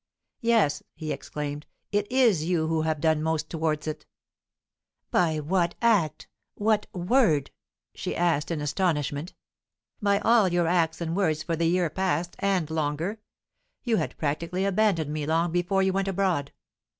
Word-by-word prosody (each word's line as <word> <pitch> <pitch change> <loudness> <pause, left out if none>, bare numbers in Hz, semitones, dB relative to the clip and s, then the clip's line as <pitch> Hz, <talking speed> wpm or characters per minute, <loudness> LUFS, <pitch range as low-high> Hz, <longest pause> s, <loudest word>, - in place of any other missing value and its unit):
"Yes," 230 - +2
he 155 -1 -5
exclaimed, 145 +2 -5 0.2
"it 205 +1 0
is 235 -11 +4
you 170 -2 +1
who 160 0 0
have 155 -1 -1
done 160 0 +2
most 160 0 -1
towards 155 -2 -1
it!" 155 -1 -5 1.0
"By 160 -3 +2
what 170 +3 0
act? 180 -10 +2 0.3
what 210 0 +1
word?" 180 - +2 0.4
she - - -4
asked, 165 -4 +1
in 165 -3 -2
astonishment. 150 -1 -1 0.7
"By 200 -1 +3
all 220 0 +4
your 175 -1 +1
acts 165 -1 +1
and 165 0 -2
words 160 -6 +1
for 165 - -1
the 165 +1 +1
year 175 -2 +1
past, 175 -1 -1
and 185 -6 0
longer. 160 +7 -2 0.6
You 230 -3 +1
had - - -3
practically 170 +5 -1
abandoned 190 -7 +1
me 150 -1 -3
long 165 +2 +1
before 175 +3 +1
you 190 0 +1
went 195 0 0
abroad. 185 -7 0
170 Hz, 150 wpm, -26 LUFS, 155-195 Hz, 1.0 s, is